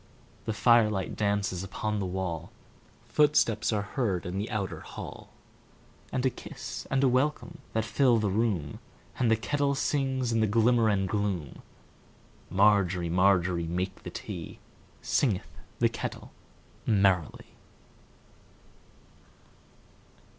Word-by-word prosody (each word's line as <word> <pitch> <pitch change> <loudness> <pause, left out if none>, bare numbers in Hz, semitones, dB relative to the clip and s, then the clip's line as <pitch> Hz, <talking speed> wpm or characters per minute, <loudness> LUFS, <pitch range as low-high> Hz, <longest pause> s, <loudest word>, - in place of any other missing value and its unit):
The 110 - -1
firelight 110 -4 +3
dances 100 -3 0
upon 105 +2 -3
the 95 - -2
wall, 90 -3 -4 0.6
Footsteps 150 -8 +3
are 105 -2 0
heard 105 -5 -2
in 90 +2 -3
the 105 - -3
outer 100 -4 -3
hall, - - -9 0.8
And 130 0 -1
a 130 - +3
kiss - - -8
and 135 0 +1
a - - +6
welcome 130 -1 0
that 110 0 0
fill 125 +1 +3
the 105 -3 0
room, 95 -9 -1 0.4
And 125 -3 +3
the 110 - +5
kettle 140 +6 0
sings 135 -3 0
in 115 - +1
the 110 - +3
glimmer 115 +1 +3
and 95 -2 +1
gloom. 100 -6 -2 0.9
Margery, 95 -3 +3
Margery, 90 -1 +2
make 90 +3 -3
the - - -7
tea, - - -7 0.5
Singeth 110 -10 0 0.3
the - - +4
kettle - - -6 0.6
merrily. 95 -6 +1
105 Hz, 120 wpm, -28 LUFS, 95-120 Hz, 0.9 s, a